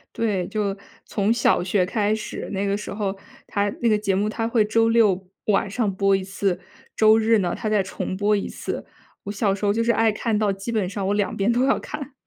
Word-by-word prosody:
对， 200 -6 0
就 205 -2 -1 0.3
从 205 +1 0
小 235 -6 +2
学 185 0 +1
开 210 +2 0
始， 220 - -6
那 200 0 -1
个 200 0 +1
时 210 - -6
候 200 -1 -2 0.3
它 205 0 0
那 240 - +2
个 215 -2 +4
节 200 -2 0
目 205 +2 +1
它 225 +1 -2
会 230 -2 +2
周 225 +1 +2
六 205 -5 +3 0.2
晚 200 -1 +2
上 205 -1 -1
播 195 0 +3
一 195 - -2
次， 195 -1 -1 0.4
周 220 0 +6
日 225 0 +4
呢， 180 -3 0
它 215 - -3
再 210 -2 +2
重 185 0 -4
播 210 +1 +2
一 200 - -2
次。 - - -5 0.4
我 200 - -3
小 200 -1 +1
时 200 - -6
候 200 - +4
就 230 +2 +1
是 235 - +3
爱 225 0 +3
看 215 +1 -1
到 210 -2 +2
基 195 +4 -5
本 210 -5 0
上 200 0 -3
我 200 - +1
两 205 -1 0
边 200 +4 +2
都 245 +2 +2
要 270 - +3
看。 290 -3 -7
210 Hz, 255 characters per minute, -23 LUFS, 195-225 Hz, 0.4 s, 周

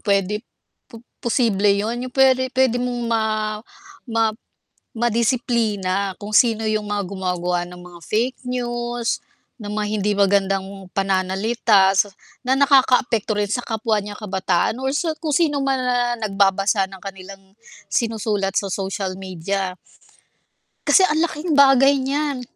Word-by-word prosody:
pwede, 200 +1 0 0.5
po 230 0 -13 0.2
posible 220 -4 +1
yun 225 +5 -2
yung 250 - -17
pwede 260 -1 +3
pwede 260 -2 +2
mong 245 0 -2
ma 225 -1 +1 0.9
ma 230 0 +1 0.8
ma-disiplina 225 -5 0
kung 205 - -6
sino 225 -2 +4
yung 215 0 0
mga 205 0 -2
gumagawa 180 -2 -2
ng 180 - -11
mga 175 -1 -12
fake 235 - -1
news, 240 -1 -2 0.4
ng 205 - -6
mga 210 0 -2
hindi 210 0 0
magandang 195 -1 +2 0.3
pananalita, 195 +1 +2
sa 205 +1 +3 0.3
na 260 +2 +1
nakaka-apekto 255 -6 +3
rin 205 - 0
sa 245 - -1
kapwa 220 -2 -1
niyang 205 0 -8
kabataan 190 +1 0
or 265 - 0
sa 315 +2 -1
kung 310 -2 -2
sino 295 -4 +2
man 270 -1 +1
ang 245 -2 0
nag-babasa 195 0 +2
ng 190 -1 -11
kanilang 195 0 -10 0.4
sinusulat 215 -4 -1
sa 200 - 0
social 190 0 -3
media. 185 0 -4 1.1
Kasi 375 -2 +6
ang 310 -1 0
laking 320 -1 -1
bagay 275 0 +6
niyan. 275 0 -2
215 Hz, 135 wpm, -21 LUFS, 195-250 Hz, 1.1 s, Kasi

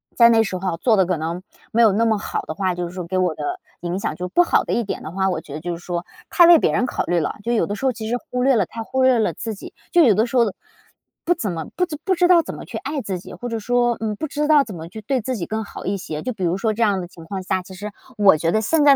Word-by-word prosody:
在 235 - +7
那 225 -1 +5
时 195 -3 -3
候 185 -2 -2
做 220 +4 +3
的 190 - +4
可 180 +1 0
能， 165 +3 -3 0.3
没 230 - +3
有 225 -3 +6
那 225 +3 +2
么 220 -2 +2
好 205 - -3
的 - - -6
话， 185 -1 0
就 175 0 -3
是 - - -12
说 180 -1 -5
给 185 +2 -1
我 180 -3 +2
的 365 0 -4 0.2
影 175 +1 -2
响 155 - -2
就 180 +2 -4
不 275 - +4
好 - - +2
的 - - -2
一 235 - +1
点 200 - -5
的 155 - -6
话， 190 +1 0
我 180 - -1
觉 145 - -11
得 155 - -6
就 175 0 -3
是 175 - -15
说， 175 -1 -3 0.2
太 345 -2 +6
为 340 -2 +8
别 - - +1
人 250 - +2
考 - - -2
虑 175 0 +1
了， 150 - -2
就 235 - 0
有 230 - +2
的 205 - -3
时 270 - -4
候 260 - +2
其 220 -1 -6
实 240 - +1
忽 250 0 -1
略 265 0 +4
了 - - +2
太 230 - -7
忽 260 +3 0
略 260 -2 +5
了 220 - +2
自 225 -2 -5
己。 - - -11 0.2
就 350 - +5
有 235 -7 +6
的 220 +3 +3
时 245 - -6
候， 245 - +6 0.8
不 350 - +3
怎 210 - -2
么， 165 -2 -4
不 360 - +2 0.2
不 380 - +1
知 355 0 +3
道 350 -2 +6
怎 - - -7
么 - - -9
去 - - -9
爱 280 +3 -3
自 190 -6 -4
己， - - -10
或 245 - -6
者 230 -1 -2
说， 240 +2 +1
嗯， 215 -1 -2
不 310 - -4
知 295 +1 -1
道 300 -2 +6
怎 215 - -9
么 165 -1 -7
去 220 - -8
对 255 +4 -1
自 255 +4 -3
己 175 - -3
更 220 0 -3
好 - - -9
一 200 - 0
些。 155 -5 -5
就 255 - -2
比 200 -4 -6
如 175 +1 +1
说 215 +2 0
这 225 - -4
样 200 -4 +2
的 175 - -6
情 170 -2 -14
况 190 +2 -5
下， 185 0 0
其 185 +1 -12
实， 205 +3 -6 0.3
我 200 -4 +6
觉 165 +2 0
得 215 - +2
现 310 +7 +2
在 285 -1 +7
215 Hz, 355 characters per minute, -21 LUFS, 180-250 Hz, 0.8 s, 为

